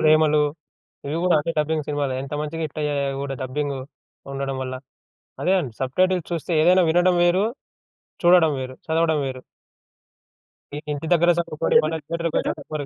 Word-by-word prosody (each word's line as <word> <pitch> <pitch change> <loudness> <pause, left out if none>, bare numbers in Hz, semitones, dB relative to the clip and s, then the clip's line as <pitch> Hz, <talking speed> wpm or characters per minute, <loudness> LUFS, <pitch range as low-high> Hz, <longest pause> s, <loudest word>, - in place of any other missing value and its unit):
ప్రేమలు 155 -1 +4 0.6
ఇవి 150 - -2
గూడా 180 -2 +4
అంటే 155 - -3
డబ్బింగ్ 150 0 0
సినిమాలే. 145 -3 -1
ఎంత 140 - -8
మంచిగా 160 +2 -4
హిట్టయ్యాయో 150 -1 -2
అవి 135 - -5
గూడా 135 -1 -3
డబ్బింగు 140 +1 -3 0.5
ఉండడం 135 -1 -3
వల్ల. 130 0 -4 0.7
అదే. 185 - +3 0.3
సబ్‌టైటిల్స్ 185 +6 +1
చూస్తే 170 +1 -3
ఏదైనా 180 +2 +5
వినడం 175 +2 +3
వేరు, 185 +4 +3 0.8
చూడడం 175 -2 +6
వేరు, 130 0 -6
చదవడం 160 -1 +2
వేరు. 130 -1 -5 1.3
ఈ - - -4 0.2
ఇంటి 145 +2 -5
దగ్గర 170 0 +4
చదువుకోరు. 165 -3 -1
బడి 160 +1 -1 0.2
దగ్గర 170 0 -1 0.2
చదువుకోరు. 150 -2 -5
155 Hz, 145 wpm, -23 LUFS, 140-170 Hz, 1.3 s, చూడడం